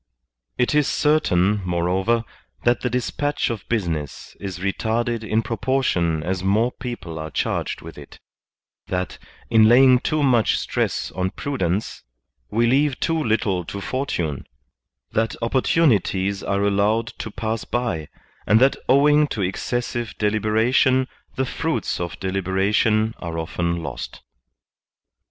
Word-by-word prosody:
It 125 Hz, +2 st, +1 dB
is 150 Hz, -2 st, +3 dB
certain, 105 Hz, -, +2 dB
moreover, 90 Hz, +6 st, +1 dB, 0.4 s
that 120 Hz, 0 st, +2 dB
the 125 Hz, -, 0 dB
dispatch 125 Hz, +3 st, -1 dB
of 110 Hz, -5 st, -7 dB
business 85 Hz, -, -3 dB
is 95 Hz, -3 st, -5 dB
retarded 110 Hz, +5 st, -1 dB
in 110 Hz, +1 st, 0 dB
proportion 100 Hz, -10 st, 0 dB
as 95 Hz, +2 st, -2 dB
more 110 Hz, +6 st, +2 dB
people 115 Hz, -12 st, -6 dB
are 80 Hz, 0 st, -5 dB
charged -, -, -2 dB
with -, -, -10 dB
it; -, -, -13 dB, 0.7 s
that, 90 Hz, 0 st, -3 dB, 0.3 s
in 110 Hz, -1 st, +6 dB
laying 130 Hz, +1 st, +7 dB
too 155 Hz, +3 st, 0 dB
much 120 Hz, -5 st, +3 dB
stress -, -, -2 dB
on 95 Hz, 0 st, -1 dB
prudence, 100 Hz, -7 st, -2 dB, 0.5 s
we 115 Hz, +3 st, +2 dB
leave 135 Hz, +3 st, +2 dB
too 165 Hz, -1 st, 0 dB
little 105 Hz, -6 st, 0 dB
to 100 Hz, -, -6 dB
fortune; 95 Hz, -, -3 dB, 0.6 s
that 115 Hz, 0 st, 0 dB
opportunities 115 Hz, -, +1 dB
are 100 Hz, 0 st, 0 dB
allowed 100 Hz, +3 st, +2 dB
to -, -, -4 dB
pass 110 Hz, +1 st, -3 dB
by, 115 Hz, -11 st, -2 dB, 0.4 s
and 105 Hz, +2 st, +5 dB
that 135 Hz, +2 st, +4 dB
owing 145 Hz, +2 st, +5 dB
to 105 Hz, -7 st, -3 dB
excessive 120 Hz, +5 st, -3 dB
deliberation 110 Hz, +5 st, +2 dB, 0.3 s
the 130 Hz, -, 0 dB
fruits 160 Hz, +5 st, -2 dB
of 85 Hz, -1 st, -5 dB
deliberation 95 Hz, +4 st, +1 dB
are 85 Hz, -1 st, -5 dB
often 85 Hz, +1 st, -2 dB
lost. -, -, -7 dB
110 Hz, 130 wpm, -22 LUFS, 95-125 Hz, 0.7 s, laying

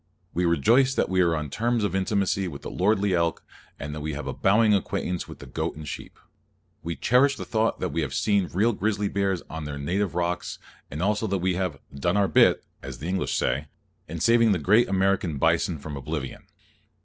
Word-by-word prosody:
We 90 Hz, +1 st, 0 dB
rejoice 115 Hz, -, +3 dB
that -, -, +1 dB
we 95 Hz, 0 st, +2 dB
are 85 Hz, -2 st, +3 dB
on 75 Hz, -3 st, -4 dB
terms 120 Hz, -1 st, 0 dB
of 105 Hz, -, -1 dB
intimacy 95 Hz, 0 st, 0 dB
with 70 Hz, -5 st, -8 dB
the -, -, -6 dB
lordly 100 Hz, +1 st, +1 dB
elk, 85 Hz, -1 st, 0 dB, 0.4 s
and 75 Hz, +1 st, -5 dB
that 75 Hz, -, -6 dB
we 75 Hz, +1 st, -3 dB
have 75 Hz, -, -5 dB
a -, -, -3 dB
bowing 105 Hz, +2 st, +3 dB
acquaintance 90 Hz, -2 st, -1 dB
with -, -, -10 dB
the -, -, -11 dB
goat -, -, -3 dB
and 75 Hz, 0 st, -9 dB
sheep. -, -, -8 dB, 0.6 s
We 85 Hz, +1 st, -4 dB
cherish 135 Hz, +3 st, +3 dB
the -, -, -7 dB
thought 110 Hz, 0 st, 0 dB
that -, -, -1 dB
we 85 Hz, -, 0 dB
have 70 Hz, -3 st, -3 dB
seen 100 Hz, -4 st, +1 dB
real 110 Hz, +6 st, +2 dB
grizzly 105 Hz, -1 st, -1 dB
bears 95 Hz, -3 st, -1 dB
on 80 Hz, -1 st, -6 dB
their 75 Hz, -1 st, -5 dB
native 90 Hz, +6 st, -1 dB
rocks, 90 Hz, 0 st, -2 dB, 0.3 s
and 75 Hz, +6 st, -4 dB
also 105 Hz, +2 st, +1 dB
that 100 Hz, -1 st, 0 dB
we 90 Hz, 0 st, 0 dB
have 90 Hz, -5 st, -2 dB, 0.2 s
"done 85 Hz, +7 st, 0 dB
our 100 Hz, -1 st, +3 dB
bit," -, -, +4 dB, 0.2 s
as 65 Hz, -2 st, -7 dB
the 75 Hz, -, -6 dB
English 95 Hz, +1 st, -1 dB
say, 70 Hz, +5 st, 0 dB, 0.4 s
in 85 Hz, +2 st, -6 dB
saving 115 Hz, +2 st, +4 dB
the -, -, +1 dB
great 100 Hz, +9 st, +3 dB
American 95 Hz, -5 st, +1 dB
bison 80 Hz, +3 st, +1 dB
from 75 Hz, +1 st, -7 dB
oblivion. 70 Hz, 0 st, -5 dB
90 Hz, 210 wpm, -25 LUFS, 80-105 Hz, 0.6 s, bit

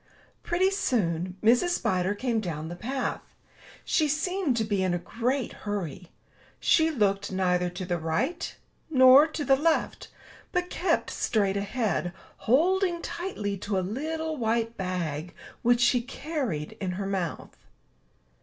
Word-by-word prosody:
Pretty 370 Hz, +3 st, +1 dB
soon 185 Hz, -, 0 dB
Mrs. 245 Hz, +11 st, +4 dB
Spider 185 Hz, +2 st, 0 dB
came 235 Hz, +1 st, 0 dB
down 160 Hz, -6 st, -4 dB
the 175 Hz, -, -6 dB
path. 255 Hz, +8 st, -3 dB, 0.6 s
She 310 Hz, -, +2 dB
seemed 310 Hz, -1 st, 0 dB
to 225 Hz, -, +2 dB
be 205 Hz, -3 st, 0 dB
in 185 Hz, -2 st, +1 dB
a -, -, +1 dB
great 240 Hz, +8 st, -2 dB
hurry. 185 Hz, -5 st, -5 dB, 0.5 s
She 320 Hz, -1 st, +4 dB
looked 200 Hz, -8 st, 0 dB
neither 180 Hz, -1 st, +1 dB
to 180 Hz, +1 st, -6 dB
the 175 Hz, -1 st, -1 dB
right 160 Hz, -, -2 dB, 0.3 s
nor 265 Hz, +1 st, +8 dB
to 310 Hz, -2 st, -4 dB
the 270 Hz, -, +5 dB
left, 315 Hz, +4 st, 0 dB, 0.4 s
but 360 Hz, 0 st, -1 dB
kept 370 Hz, -, 0 dB
straight 200 Hz, -4 st, +1 dB
ahead, 200 Hz, -3 st, -1 dB, 0.4 s
holding 345 Hz, -, +3 dB
tightly 210 Hz, -, -3 dB
to 200 Hz, +1 st, -2 dB
a 185 Hz, -, 0 dB
little 315 Hz, +7 st, -3 dB
white 230 Hz, -1 st, 0 dB
bag 175 Hz, -4 st, -3 dB, 0.3 s
which 240 Hz, 0 st, +3 dB
she 245 Hz, -1 st, +4 dB
carried 255 Hz, -, -4 dB
in 185 Hz, -2 st, -1 dB
her 195 Hz, +2 st, -4 dB
mouth. 190 Hz, -4 st, -3 dB
220 Hz, 140 wpm, -27 LUFS, 185-295 Hz, 0.6 s, nor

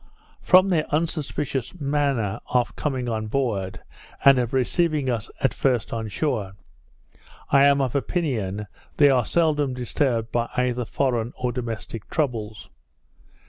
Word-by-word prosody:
From 185 Hz, +1 st, +6 dB
their 160 Hz, -4 st, +1 dB
unsuspicious 150 Hz, -2 st, -2 dB
manner 140 Hz, -8 st, 0 dB
of 125 Hz, -1 st, 0 dB
coming 130 Hz, -4 st, -2 dB
on 110 Hz, -2 st, -2 dB
board, 105 Hz, -6 st, -2 dB, 0.4 s
and 135 Hz, -2 st, +8 dB
of 120 Hz, -1 st, -1 dB
receiving 140 Hz, +1 st, +1 dB
us 115 Hz, -2 st, -3 dB
at 135 Hz, -, +2 dB
first 125 Hz, -4 st, 0 dB
on 110 Hz, -1 st, -3 dB
shore, 105 Hz, -5 st, -2 dB, 1.0 s
I 140 Hz, 0 st, +6 dB
am 140 Hz, 0 st, +4 dB
of 130 Hz, -3 st, -1 dB
opinion, 120 Hz, -, -1 dB, 0.3 s
they 145 Hz, -2 st, +6 dB
are 125 Hz, -3 st, +2 dB
seldom 150 Hz, -5 st, +1 dB
disturbed 120 Hz, -2 st, -1 dB
by 120 Hz, 0 st, 0 dB
either 125 Hz, -1 st, 0 dB
foreign 120 Hz, -2 st, -1 dB
or 125 Hz, -1 st, -1 dB
domestic 115 Hz, -3 st, -5 dB
troubles. 110 Hz, -, -2 dB
125 Hz, 135 wpm, -24 LUFS, 115-145 Hz, 1.0 s, and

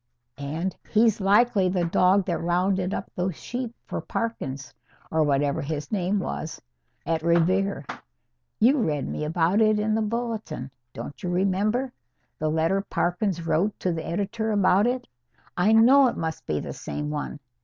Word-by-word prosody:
And 160 Hz, +7 st, -3 dB
he's 220 Hz, -1 st, +3 dB
likely 200 Hz, 0 st, +4 dB
the 180 Hz, -2 st, 0 dB
dog 185 Hz, +3 st, +3 dB
that 175 Hz, -3 st, -2 dB
rounded 180 Hz, +2 st, +1 dB
up -, -, -4 dB
those 180 Hz, -1 st, -2 dB
sheep 245 Hz, +3 st, -5 dB
for -, -, -4 dB
Parkins 135 Hz, -13 st, -4 dB, 0.4 s
or 160 Hz, -, +2 dB
whatever 145 Hz, -1 st, +1 dB
his 145 Hz, 0 st, -4 dB
name 195 Hz, -1 st, 0 dB
was 165 Hz, -4 st, -4 dB, 0.5 s
at 160 Hz, +1 st, 0 dB
Revere. 170 Hz, 0 st, +2 dB, 0.7 s
You 265 Hz, +6 st, +5 dB
read 150 Hz, -, 0 dB
me -, -, -3 dB
about 165 Hz, +6 st, +2 dB
it 215 Hz, -1 st, +4 dB
in 215 Hz, +1 st, +1 dB
the 220 Hz, -, +1 dB
Bulletin, 220 Hz, -, -3 dB, 0.2 s
don't 145 Hz, -, -8 dB
you 180 Hz, -, -3 dB
remember? 200 Hz, +8 st, 0 dB, 0.5 s
The 155 Hz, -, 0 dB
letter 165 Hz, +5 st, +1 dB
Parkins 175 Hz, -2 st, -1 dB
wrote 190 Hz, +6 st, 0 dB
to 180 Hz, -, 0 dB
the 160 Hz, -1 st, -4 dB
editor 205 Hz, +5 st, -2 dB
about 200 Hz, +1 st, +4 dB
it? 250 Hz, 0 st, -2 dB, 0.5 s
I 190 Hz, +5 st, +3 dB
know 255 Hz, +5 st, +7 dB
it 240 Hz, -, -2 dB
must 160 Hz, -1 st, -4 dB
be 75 Hz, -, 0 dB
the -, -, -5 dB
same 150 Hz, 0 st, -5 dB
one. 150 Hz, 0 st, -4 dB
185 Hz, 160 wpm, -25 LUFS, 160-215 Hz, 0.7 s, know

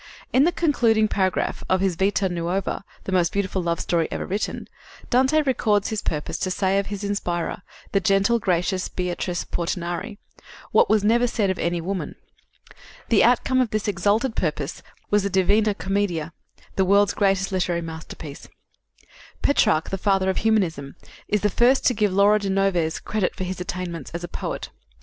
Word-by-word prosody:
In 265 Hz, +3 st, +5 dB
the 345 Hz, -, +3 dB
concluding 235 Hz, -11 st, +2 dB
paragraph 190 Hz, -3 st, -1 dB
of 185 Hz, -, +3 dB
his 190 Hz, -2 st, +1 dB
Vita 195 Hz, +2 st, +1 dB
Nuova 175 Hz, +3 st, -2 dB, 0.2 s
the -, -, -5 dB
most 180 Hz, -2 st, +2 dB
beautiful 190 Hz, -1 st, -1 dB
love 170 Hz, -1 st, -1 dB
story 165 Hz, -2 st, 0 dB
ever -, -, -3 dB
written 200 Hz, +3 st, -3 dB, 0.4 s
Dante 265 Hz, +5 st, +3 dB
records 215 Hz, -7 st, +1 dB
his 220 Hz, -2 st, -2 dB
purpose 150 Hz, -1 st, -3 dB
to 190 Hz, -, -1 dB
say 190 Hz, +1 st, +1 dB
of 200 Hz, -, -3 dB
his 205 Hz, 0 st, -5 dB
inspirer, 180 Hz, -4 st, -2 dB, 0.3 s
the 195 Hz, -, +3 dB
gentle, 195 Hz, +5 st, +2 dB
gracious 185 Hz, -1 st, 0 dB
Beatrice 180 Hz, -1 st, -3 dB
Portinari, 175 Hz, +3 st, -3 dB, 0.5 s
"what -, -, +4 dB
was 215 Hz, -1 st, +3 dB
never 235 Hz, +3 st, +3 dB
said 210 Hz, -5 st, 0 dB
of 190 Hz, -, -5 dB
any 170 Hz, 0 st, 0 dB
woman." 185 Hz, +3 st, -4 dB, 0.9 s
The 225 Hz, -, +5 dB
outcome 255 Hz, +2 st, +3 dB
of 250 Hz, -, 0 dB
this 215 Hz, 0 st, -2 dB
exalted 210 Hz, +6 st, +1 dB
purpose 150 Hz, -2 st, -2 dB, 0.3 s
was 205 Hz, 0 st, +4 dB
the 200 Hz, -, -1 dB
Divina 200 Hz, +3 st, +2 dB
Commedia, 190 Hz, -5 st, -2 dB, 0.4 s
the 190 Hz, -, +4 dB
world's 200 Hz, +2 st, +4 dB
greatest 195 Hz, -1 st, +1 dB
literary 175 Hz, -2 st, 0 dB
masterpiece. 160 Hz, -2 st, -8 dB, 1.0 s
Petrarch, 160 Hz, -, +2 dB
the 195 Hz, -, -2 dB
father 190 Hz, -1 st, +2 dB
of -, -, -5 dB
humanism, 175 Hz, -11 st, 0 dB, 0.3 s
is 210 Hz, -1 st, +1 dB
the 210 Hz, -, +3 dB
first 250 Hz, +6 st, +3 dB
to 250 Hz, -, +4 dB
give 210 Hz, -3 st, +1 dB
Laura 200 Hz, +2 st, +4 dB
de 200 Hz, -1 st, -3 dB
Noves 190 Hz, -4 st, +1 dB
credit 210 Hz, -4 st, -2 dB
for 190 Hz, -, -4 dB
his 185 Hz, 0 st, -4 dB
attainments 175 Hz, -4 st, -5 dB
as 170 Hz, -, -5 dB
a -, -, -3 dB
poet. -, -, -5 dB
195 Hz, 170 wpm, -23 LUFS, 175-210 Hz, 1.0 s, In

